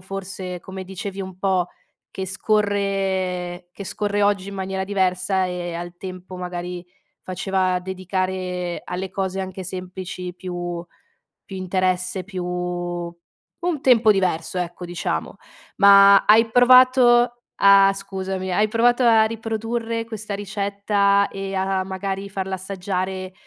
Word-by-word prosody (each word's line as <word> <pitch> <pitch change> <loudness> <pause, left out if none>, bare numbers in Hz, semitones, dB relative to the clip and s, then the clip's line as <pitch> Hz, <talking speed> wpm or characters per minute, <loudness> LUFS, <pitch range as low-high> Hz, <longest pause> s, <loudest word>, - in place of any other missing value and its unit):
forse, 185 -1 -6
come 190 0 -8
dicevi 195 +1 -6
un 185 -1 -7
po', 185 -2 +1 0.4
che 190 0 -4
scorre 190 -3 -1
che 200 - -8
scorre 205 +1 -1
oggi 200 -1 +1
in 200 - -7
maniera 190 0 -3
diversa 190 -1 +1
e 175 -1 -4
al 175 +1 -6
tempo 185 0 -8
magari 180 0 -5 0.4
faceva 185 0 0
dedicare 185 -1 -3
alle 185 +1 -4
cose 190 0 -3
anche 190 0 -5
semplici 180 0 -6
più 175 -2 -5 0.6
più 190 - -8
interesse, 185 0 -1
più 185 -2 -5
un 175 - -5
tempo 235 -4 +5
diverso, 185 -2 -1
ecco, 175 0 -4
diciamo. 125 - -3 0.4
Ma 200 0 +8
hai 225 +2 +5
provato 245 -1 +6 0.2
a 195 0 +7
scusami, 190 -1 -4
hai 210 +4 +3
provato 240 +3 +3
a 225 -2 +6
riprodurre 225 +1 -3
questa 215 -2 -6
ricetta 200 0 +1
e 195 0 -5
a 190 0 0
magari 195 +1 -4
farla 190 -1 -3
assaggiare 185 0 -4
190 Hz, 125 wpm, -22 LUFS, 180-200 Hz, 0.6 s, Ma